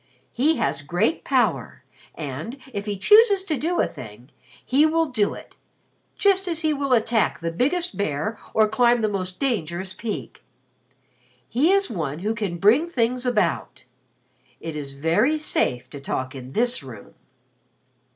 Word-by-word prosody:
"He 300 +7 +2
has - - -1
great 175 - 0
power - - 0 0.3
and, 155 - -6 0.2
if 200 0 -4
he 205 -1 -2
chooses 415 - +5
to 325 -5 -1
do 330 +6 -1
a - - +4
thing, 120 -2 -11 0.3
he 275 +4 +3
will 325 +1 +3
do 230 -8 0
it - - -13 0.6
just 390 -2 +3
as 335 -2 -2
he 310 -1 +2
will 275 -2 0
attack 225 -1 +2
the 165 0 -3
biggest 340 - 0
bear 200 +3 -2 0.2
or 220 -1 +5
climb 235 +2 +3
the - - +3
most 185 -3 -3
dangerous 190 - -1
peak. 215 +2 -6 1.0
He 285 +10 +2
is 395 -8 +2
one 155 -8 -3
who 210 +6 -2
can 205 -6 -3
bring 240 - +4
things 250 -3 0
about. 210 -9 -1 0.8
It 160 -1 -6
is 140 -2 -5
very 200 - +2
safe 125 - 0
to 145 - -8
talk 130 -1 -3
in 130 -1 -9
this 245 -3 0
room." 125 -7 -12
220 Hz, 155 wpm, -23 LUFS, -, 1.0 s, chooses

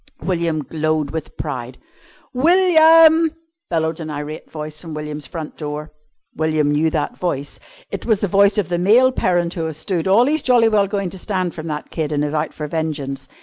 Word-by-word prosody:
William 165 -3 -1
glowed 155 -1 -1
with 160 -2 -6
pride. 130 -4 -5 0.6
"William!" 325 +1 +5 0.3
bellowed 160 -1 -1
an 160 -1 -6
irate 150 +1 -6
voice 155 -1 -7
from 165 -3 -7
William's 150 -1 -6
front 160 -4 -7
door. 150 0 -6 0.4
William 155 -1 +1
knew 155 +2 +2
that 155 -2 -2
voice. 145 -6 -3 0.3
It - - -5
was 220 -4 +3
the 205 - +1
voice 200 +2 +3
of 205 -6 0
the 175 -1 0
male 235 +8 +5
parent 175 -7 0
who 165 -3 -3
has 160 -2 -5
stood 170 +2 -2
all 210 +6 +5
he's 310 +3 +1
jolly 240 -3 +4
well 205 -2 +2
going 195 -3 -2
to 190 - -9
stand 185 -3 -2
from 155 0 -7
that 150 -1 -5
kid, 155 -2 -3
and 150 0 0
is 150 - -3
out 155 0 -1
for 150 - -6
vengeance. 145 -4 -4
160 Hz, 190 wpm, -20 LUFS, 150-200 Hz, 0.6 s, William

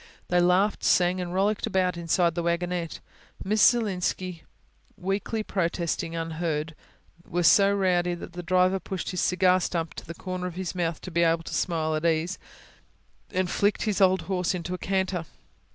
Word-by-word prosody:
They 180 - +3
laughed, 185 +4 +2
sang, 180 +1 +3
and 175 -1 -4
rollicked 200 +3 +1
about 185 -1 +1
inside 170 0 +1
the 170 - -2
wagonette, 170 0 -2 0.4
Miss 210 +2 +1
Zielinski 185 -5 +1 0.5
weakly 200 +4 -2
protesting 170 -3 -2
unheard 165 -1 -2 0.5
were 175 +1 -2
so 200 +3 +6
rowdy 180 -3 +1
that 175 - -9
the 175 - -5
driver 185 +2 +2
pushed 190 0 -5
his 180 - -2
cigar 185 0 +3
stump 170 -3 -2
to - - -9
the 170 - -7
corner 185 0 -4
of 175 - -7
his 185 -1 -4
mouth, 170 -3 -2
to 185 - -8
be 170 +1 +1
able 165 0 +2
to - - -7
smile 160 -3 0
at 155 0 -2
ease, 165 +2 0 0.9
and 185 -2 -1
flicked 205 +1 +1
his 210 -3 0
old 190 0 +4
horse 185 -2 -1
into 180 0 -4
a 180 - -4
canter. 190 -3 -1
180 Hz, 170 wpm, -26 LUFS, 170-190 Hz, 0.9 s, so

